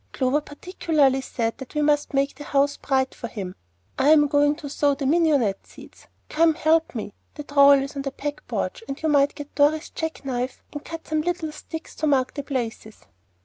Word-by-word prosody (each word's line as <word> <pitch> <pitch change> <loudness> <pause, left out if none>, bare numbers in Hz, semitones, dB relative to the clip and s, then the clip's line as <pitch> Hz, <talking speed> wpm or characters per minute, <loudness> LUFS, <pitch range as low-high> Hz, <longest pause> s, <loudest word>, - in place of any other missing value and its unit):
Clover 265 +3 +1
particularly 290 -3 0
said 230 -3 -3
that 265 +2 -10
we 300 - +1
must 295 -1 +1
make 275 +1 +1
the 290 - -10
house 285 0 +1
bright 265 -1 0
for 235 - -7
him. 195 -6 -6 0.5
I'm 295 +2 +6
going 290 0 +3
to 295 -2 -8
sow 285 0 +1
the 275 - -4
mignonette 285 - +2
seed - - -14
[desperately]; - - -22 0.2
come 330 +2 +3
and 315 - -1
help 320 -2 +2
me. 210 -3 -5 0.2
The 295 - -6
trowel 280 -1 +6
is 275 +2 -7
on 280 - -3
the 275 - -3
back 290 +2 -6
porch, - - -3
and 275 - -5
you 315 - -1
might 285 -1 +3
get 290 0 -9
Dorry's 300 +2 +2
jack 320 -3 -5
knife 250 -1 -3
and 290 - -6
cut 330 -1 -8
some 310 0 0
little 340 -1 -2
sticks 320 +1 -8
to 310 - 0
mark 265 -3 +2
the 285 - -4
places." 235 -6 -5
285 Hz, 210 wpm, -24 LUFS, 270-305 Hz, 0.5 s, I'm